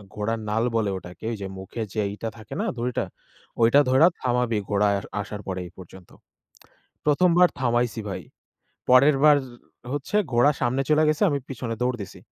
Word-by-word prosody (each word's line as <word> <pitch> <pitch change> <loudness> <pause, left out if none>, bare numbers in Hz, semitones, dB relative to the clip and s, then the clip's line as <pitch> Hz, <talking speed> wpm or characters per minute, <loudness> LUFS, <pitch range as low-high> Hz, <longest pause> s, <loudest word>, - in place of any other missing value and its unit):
ঘোড়ার 110 +2 -2
নাল 110 +2 +1
বলে 110 -3 +1
ওটাকে। 90 +4 -11
ওই 110 - -4
যে 95 - -4
মুখে 95 +5 -7
যে, 110 - 0
ই - - -7
টা 115 - -2
থাকে 110 - -10
না - - -1
দড়িটা? 120 +1 -1 0.6
ওইটা 120 +5 +6
ধইরা 135 +6 +6
থামাবি 125 -3 0
ঘোড়ায় 100 0 +2 0.2
আসার 105 +1 -7
পর 95 - -2
এই - - -9
পর্যন্ত। 95 0 -13 1.0
প্রথমবার 175 +3 +5
থামাইছি 120 -2 0
ভাই। 95 - -5 0.7
পরেরবার 140 +3 +6 0.6
হচ্ছে 145 +8 -2 0.2
ঘোড়া 120 +5 +5
সামনে 130 +3 +1
চইলা 155 +1 +4
গেছে 155 +5 +1
আমি 140 - 0
পিছনে 120 -3 -4
দৌড় 125 0 0
দিছি! 95 - -10
120 Hz, 165 wpm, -24 LUFS, 105-140 Hz, 1.0 s, ওইটা